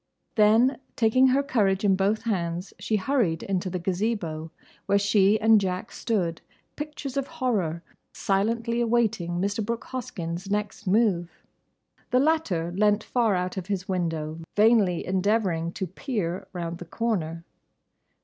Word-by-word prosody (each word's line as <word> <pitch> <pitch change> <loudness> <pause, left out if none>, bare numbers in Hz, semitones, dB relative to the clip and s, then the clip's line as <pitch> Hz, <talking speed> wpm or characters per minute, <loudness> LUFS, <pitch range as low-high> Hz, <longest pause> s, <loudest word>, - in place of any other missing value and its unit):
Then 225 +5 +4 0.2
taking 250 +3 +4
her 270 +2 +3
courage 205 -7 +1
in 195 -1 +4
both 200 +3 +1
hands 175 -4 -2
she 220 - -1
hurried 205 - 0
into 190 -1 -1
the 180 - -3
Gazebo, 175 -3 -2 0.4
where 200 - +4
she 200 +1 +3
and 220 -1 +5
Jack 185 +3 -3
stood, 180 -8 -1 0.3
pictures 295 -2 -6
of 275 -1 -1
horror, 210 - -1 0.3
silently 230 +4 0
awaiting 225 -7 +1
Mr. 205 +4 -1
Brooke 230 +2 -3
Hoskyn's 185 -7 -5
next 210 0 -3
move. 185 -4 +2 0.8
The 250 - +3
latter 260 - +1
leant 210 +1 +3
far 230 -5 +1
out 180 +1 -2
of 185 -1 -4
his 195 -1 -3
window 165 -4 -2 0.2
vainly 210 -5 +4
endeavouring 185 -3 +1
to 190 - -3
peer 190 - -3
round 170 -1 -5
the 175 - -7
corner. 170 -5 -2
200 Hz, 140 wpm, -26 LUFS, 175-230 Hz, 0.8 s, and